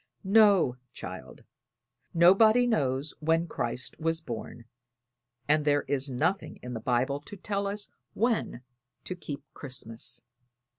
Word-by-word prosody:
"No, 195 Hz, -, +5 dB, 0.2 s
child; 65 Hz, -1 st, -9 dB, 0.7 s
nobody 215 Hz, +8 st, +6 dB
knows 140 Hz, -, 0 dB
when 165 Hz, +2 st, +2 dB
Christ 125 Hz, -5 st, -4 dB
was 165 Hz, 0 st, 0 dB
born, 120 Hz, -4 st, -7 dB, 0.8 s
and 150 Hz, +1 st, +3 dB
there 145 Hz, -1 st, +2 dB
is 140 Hz, 0 st, -1 dB
nothing 175 Hz, +10 st, -1 dB
in 125 Hz, 0 st, -6 dB
the 115 Hz, -, -4 dB
Bible 125 Hz, +4 st, 0 dB
to 175 Hz, +8 st, -11 dB
tell 200 Hz, +1 st, -2 dB
us 205 Hz, +1 st, -4 dB, 0.3 s
when 225 Hz, -, 0 dB, 0.4 s
to -, -, -4 dB
keep 145 Hz, -5 st, -7 dB
Christmas." 120 Hz, -2 st, 0 dB
150 Hz, 120 wpm, -28 LUFS, 125-195 Hz, 0.8 s, nobody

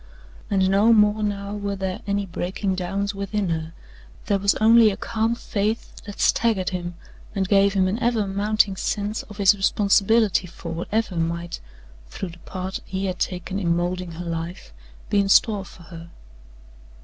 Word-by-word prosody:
And 190 Hz, -2 st, +2 dB
no 205 Hz, +4 st, +5 dB
more 210 Hz, 0 st, +4 dB
now 200 Hz, -1 st, -2 dB
were 200 Hz, -1 st, -3 dB
there 190 Hz, -1 st, -4 dB
any 200 Hz, 0 st, 0 dB
breaking 190 Hz, +2 st, -3 dB
downs 195 Hz, +2 st, -2 dB
within 200 Hz, -1 st, -2 dB
her 160 Hz, -1 st, -2 dB, 0.5 s
there 200 Hz, -1 st, +1 dB
was 200 Hz, +1 st, +2 dB
only 225 Hz, 0 st, +6 dB
a 195 Hz, -, -4 dB
calm 225 Hz, 0 st, -1 dB
faith 215 Hz, -1 st, -3 dB
that 205 Hz, -, -9 dB
staggered 215 Hz, -6 st, +2 dB
him 175 Hz, -1 st, -4 dB, 0.4 s
and 190 Hz, -1 st, 0 dB
gave 200 Hz, 0 st, +4 dB
him 190 Hz, -1 st, +3 dB
an 200 Hz, +5 st, -1 dB
ever 235 Hz, -3 st, +1 dB
mounting 200 Hz, +1 st, +1 dB
sense 205 Hz, +2 st, -2 dB
of 205 Hz, -, -13 dB
his 200 Hz, 0 st, +5 dB
responsibility 200 Hz, 0 st, +3 dB
for 170 Hz, -1 st, -8 dB
whatever 185 Hz, +3 st, -2 dB
might, 170 Hz, +1 st, -2 dB, 0.5 s
through 185 Hz, -, -6 dB
the 170 Hz, +1 st, -13 dB
part 185 Hz, +1 st, -5 dB
he 190 Hz, +1 st, -4 dB
had 185 Hz, -1 st, -3 dB
taken 185 Hz, +2 st, -2 dB
in 170 Hz, -3 st, +1 dB
moulding 175 Hz, 0 st, -2 dB
her 175 Hz, +2 st, -7 dB
life, 165 Hz, -, -5 dB, 0.4 s
be 205 Hz, -, +4 dB
in 200 Hz, 0 st, +1 dB
store 205 Hz, 0 st, +4 dB
for 175 Hz, -, -14 dB
her. 165 Hz, 0 st, -11 dB
195 Hz, 170 wpm, -23 LUFS, 180-210 Hz, 0.5 s, only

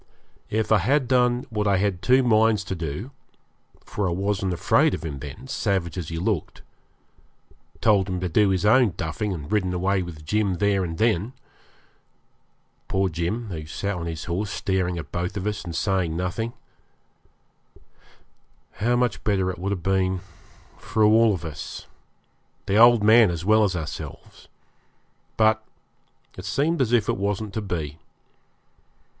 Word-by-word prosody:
If 110 Hz, +1 st, -1 dB
I 110 Hz, -, +6 dB
had 130 Hz, +7 st, +1 dB
done 125 Hz, -1 st, +2 dB
what 105 Hz, -2 st, -1 dB
I 100 Hz, -1 st, +3 dB
had 95 Hz, -2 st, -1 dB
two 130 Hz, +6 st, +4 dB
minds 110 Hz, -3 st, +3 dB
to 95 Hz, -, -4 dB
do 85 Hz, -, -5 dB, 0.7 s
for 100 Hz, -3 st, -2 dB
I -, -, -2 dB
wasn't 95 Hz, +1 st, -1 dB
afraid 85 Hz, -, +2 dB
of -, -, -8 dB
him 70 Hz, -4 st, -5 dB
then, 75 Hz, -, -9 dB
savage 100 Hz, -9 st, -1 dB
as 90 Hz, -5 st, -5 dB
he 80 Hz, -, -4 dB
looked 90 Hz, -1 st, -2 dB, 1.2 s
told 100 Hz, -3 st, +3 dB
him 90 Hz, -1 st, -2 dB
to 90 Hz, -, -2 dB
do 100 Hz, +4 st, +3 dB
his 95 Hz, 0 st, 0 dB
own 115 Hz, -4 st, +4 dB
duffing 80 Hz, +6 st, -3 dB
and 75 Hz, -5 st, -6 dB
ridden 95 Hz, -4 st, +1 dB
away 95 Hz, +2 st, +1 dB
with 80 Hz, -4 st, -8 dB
Jim 100 Hz, +2 st, 0 dB
there 100 Hz, 0 st, +1 dB
and 85 Hz, -2 st, -4 dB
then 110 Hz, +2 st, +1 dB, 1.5 s
poor 95 Hz, 0 st, +1 dB
Jim, 90 Hz, +8 st, -3 dB
who 80 Hz, -4 st, -6 dB
sat 100 Hz, +5 st, -3 dB
on 85 Hz, -1 st, -5 dB
his 80 Hz, -2 st, -5 dB
horse 95 Hz, +4 st, -2 dB
staring 95 Hz, -3 st, -1 dB
at 75 Hz, -3 st, -7 dB
both 90 Hz, +4 st, -3 dB
of 95 Hz, -, -4 dB
us, 105 Hz, 0 st, -2 dB
and 85 Hz, -2 st, -6 dB
saying 95 Hz, -5 st, 0 dB
nothing 100 Hz, +6 st, -3 dB, 2.2 s
how 120 Hz, +4 st, +1 dB
much 120 Hz, -1 st, 0 dB
better 95 Hz, -3 st, +1 dB
it 90 Hz, -, -9 dB
would 95 Hz, +2 st, -2 dB
have 90 Hz, -4 st, -3 dB
been 95 Hz, -1 st, +1 dB, 0.6 s
for 110 Hz, +2 st, 0 dB
all 110 Hz, +1 st, +5 dB
of 90 Hz, -5 st, -3 dB
us, 75 Hz, -2 st, -7 dB, 0.8 s
the 100 Hz, -, 0 dB
old 120 Hz, 0 st, +7 dB
man 110 Hz, 0 st, +6 dB
as 85 Hz, 0 st, -4 dB
well 110 Hz, +1 st, +5 dB
as 95 Hz, -3 st, +1 dB
ourselves; 80 Hz, -3 st, -7 dB, 0.9 s
but 110 Hz, 0 st, +3 dB, 0.8 s
it 90 Hz, -, -8 dB
seemed 140 Hz, -, 0 dB
as 120 Hz, -3 st, +1 dB
if 115 Hz, -4 st, +3 dB
it -, -, 0 dB
wasn't 100 Hz, +1 st, -2 dB
to 110 Hz, -, -2 dB
be. 80 Hz, -6 st, -4 dB
95 Hz, 160 wpm, -24 LUFS, 90-110 Hz, 2.2 s, old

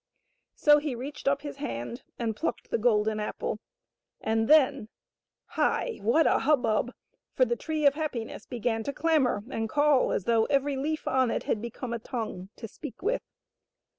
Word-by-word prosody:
So 295 Hz, 0 st, +6 dB
he 290 Hz, -4 st, -3 dB
reached 275 Hz, +4 st, -7 dB
up 280 Hz, +1 st, +2 dB
his 290 Hz, -2 st, -6 dB
hand 235 Hz, -, -5 dB, 0.2 s
and 225 Hz, -2 st, -2 dB
plucked 325 Hz, -, -3 dB
the -, -, +1 dB
golden 215 Hz, -2 st, +2 dB
apple, 210 Hz, -, -3 dB, 0.6 s
and 225 Hz, 0 st, 0 dB
then 275 Hz, -6 st, +4 dB, 0.3 s
— -, -, -63 dB
hi. 480 Hz, -, +1 dB
what 240 Hz, +10 st, +3 dB
a -, -, +4 dB
hubbub, 245 Hz, -5 st, +2 dB, 0.4 s
for 255 Hz, -, +5 dB
the 240 Hz, 0 st, 0 dB
Tree 310 Hz, +4 st, -2 dB
of 280 Hz, -, +7 dB
Happiness 285 Hz, -7 st, -4 dB
began 235 Hz, -2 st, -1 dB
to 280 Hz, -, -2 dB
clamor 295 Hz, -11 st, +2 dB
and 225 Hz, -3 st, -2 dB
call 290 Hz, +1 st, +3 dB
as -, -, 0 dB
though 225 Hz, +1 st, +3 dB
every 280 Hz, 0 st, +1 dB
leaf 305 Hz, +4 st, -2 dB
on 260 Hz, -2 st, +2 dB
it -, -, -1 dB
had 210 Hz, -, -1 dB
become 235 Hz, +1 st, -5 dB
a 235 Hz, -, -2 dB
tongue 220 Hz, -6 st, -5 dB
to 225 Hz, -, -7 dB
speak 235 Hz, -, -10 dB
with. 455 Hz, +5 st, +1 dB
255 Hz, 175 wpm, -28 LUFS, 225-290 Hz, 0.6 s, of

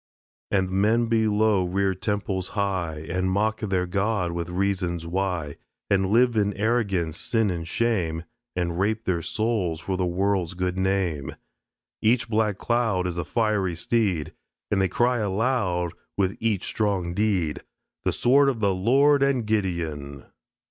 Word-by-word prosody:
And 95 Hz, -2 st, +1 dB
men 110 Hz, +5 st, +3 dB
below 110 Hz, -3 st, +2 dB
rear 95 Hz, +2 st, 0 dB
temples 95 Hz, -1 st, -2 dB
high 90 Hz, -6 st, -1 dB
And 90 Hz, +2 st, -1 dB
mock 110 Hz, +3 st, +1 dB
their 95 Hz, -4 st, 0 dB
God 95 Hz, 0 st, 0 dB
with 85 Hz, 0 st, -4 dB
reasons 90 Hz, -2 st, -1 dB
why, 90 Hz, -4 st, -2 dB, 0.3 s
And 95 Hz, -1 st, +3 dB
live, 120 Hz, +2 st, +4 dB
in 100 Hz, -2 st, +1 dB
arrogance, 100 Hz, -7 st, 0 dB
sin 115 Hz, -4 st, +1 dB
and 85 Hz, -2 st, -4 dB
shame, 90 Hz, -7 st, 0 dB, 0.3 s
And 85 Hz, -1 st, -1 dB
rape 110 Hz, +3 st, 0 dB
their 90 Hz, -3 st, 0 dB
souls 105 Hz, -5 st, -1 dB
for 95 Hz, +2 st, -3 dB
the 90 Hz, -, 0 dB
world's 95 Hz, -1 st, 0 dB
good 90 Hz, 0 st, -1 dB
name. 95 Hz, -7 st, -1 dB, 0.7 s
Each 115 Hz, +1 st, +2 dB
black 105 Hz, -3 st, +1 dB
cloud 115 Hz, -7 st, 0 dB
Is 90 Hz, -1 st, -2 dB
a -, -, -1 dB
fiery 105 Hz, -4 st, 0 dB
steed. 90 Hz, -5 st, 0 dB, 0.4 s
And 100 Hz, -2 st, +2 dB
they 95 Hz, -, +2 dB
cry 120 Hz, +5 st, +2 dB
aloud 100 Hz, -5 st, 0 dB, 0.2 s
With 95 Hz, 0 st, +1 dB
each 110 Hz, -4 st, 0 dB
strong 95 Hz, -5 st, -1 dB
deed, 95 Hz, -6 st, 0 dB, 0.4 s
"The -, -, +1 dB
sword 140 Hz, +3 st, +4 dB
of 125 Hz, -4 st, -2 dB
the 100 Hz, -3 st, +2 dB
Lord 135 Hz, +9 st, +4 dB
and 135 Hz, -4 st, +2 dB
Gideon." 85 Hz, -9 st, -2 dB
95 Hz, 150 wpm, -25 LUFS, 90-110 Hz, 0.7 s, live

